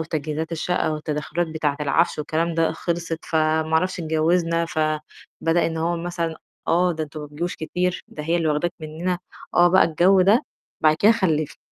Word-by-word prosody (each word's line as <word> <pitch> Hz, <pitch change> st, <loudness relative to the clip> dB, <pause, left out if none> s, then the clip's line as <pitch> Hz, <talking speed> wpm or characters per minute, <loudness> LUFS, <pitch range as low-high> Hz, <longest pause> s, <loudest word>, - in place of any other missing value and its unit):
وتجهيزات 155 Hz, 0 st, -3 dB
الشقة 165 Hz, 0 st, 0 dB
والتدخلات 155 Hz, +2 st, -2 dB
بتاعة 155 Hz, -3 st, -1 dB
العفش 150 Hz, +4 st, +1 dB
والكلام 160 Hz, +3 st, -1 dB
ده 165 Hz, 0 st, +2 dB
خلصت، 170 Hz, 0 st, -3 dB
فما 160 Hz, -1 st, +1 dB
أعرفش 180 Hz, +3 st, +1 dB
اتجوزنا، 165 Hz, +1 st, +1 dB
فبدأ 155 Hz, +2 st, -1 dB
إن 165 Hz, -, -3 dB
هو 170 Hz, +2 st, 0 dB
مثلًا 170 Hz, -1 st, -3 dB, 0.3 s
آه، 180 Hz, +1 st, +3 dB
ده 160 Hz, -1 st, -3 dB
أنتم 150 Hz, +1 st, -9 dB
ما 150 Hz, -, -6 dB
بتجوش 155 Hz, +5 st, -4 dB
كتير، 180 Hz, +3 st, -2 dB
ده 150 Hz, -, -7 dB
هي 165 Hz, +3 st, +1 dB
اللي 165 Hz, -2 st, 0 dB
واخداك 155 Hz, +3 st, 0 dB
مننا، 165 Hz, +4 st, -3 dB, 0.4 s
آه 175 Hz, 0 st, +6 dB
بقى 190 Hz, +2 st, +5 dB
الجوّ 180 Hz, +4 st, +4 dB
ده، 205 Hz, +6 st, +4 dB, 0.4 s
بعد 155 Hz, -1 st, +4 dB
كده 210 Hz, +7 st, +5 dB
خلِّفت. 160 Hz, -9 st, 0 dB
165 Hz, 170 wpm, -23 LUFS, 155-175 Hz, 0.4 s, آه